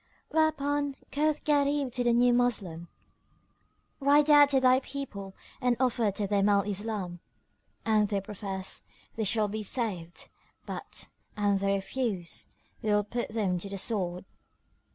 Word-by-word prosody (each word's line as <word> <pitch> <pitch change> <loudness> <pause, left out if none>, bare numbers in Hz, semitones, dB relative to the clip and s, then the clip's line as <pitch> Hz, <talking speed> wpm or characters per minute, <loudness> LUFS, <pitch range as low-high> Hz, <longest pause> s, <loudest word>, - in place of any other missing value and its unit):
Whereupon 290 -2 +1 0.2
quoth 300 +1 +1
Gharib 285 -2 +2
to 245 +1 -1
the 240 - +3
new 245 +1 +4
Moslem, 200 -9 0 1.1
"Ride 290 +2 +4
out 290 -1 +8
to 275 -2 +4
thy 255 0 +5
people 205 -9 -7 0.3
and 245 -2 +2
offer 240 -4 +2
to 200 +1 -2
them 200 0 +2
Al 200 -1 +4
Islam: 205 -3 -3 0.7
an 215 -2 +3
they 200 -1 0
profess, 195 -1 -4 0.3
they 220 - -1
shall 215 +1 +2
be 215 +2 -4
saved; 200 -7 -2 0.4
but, - - -6 0.3
an 205 -1 +2
they 195 0 +1
refuse, 195 -3 -2 0.3
we 220 - -2
will 210 0 +3
put 235 +3 -3
them 205 -5 0
to 200 - -6
the 195 - -5
sword." 185 -3 0
215 Hz, 145 wpm, -29 LUFS, 195-265 Hz, 1.1 s, out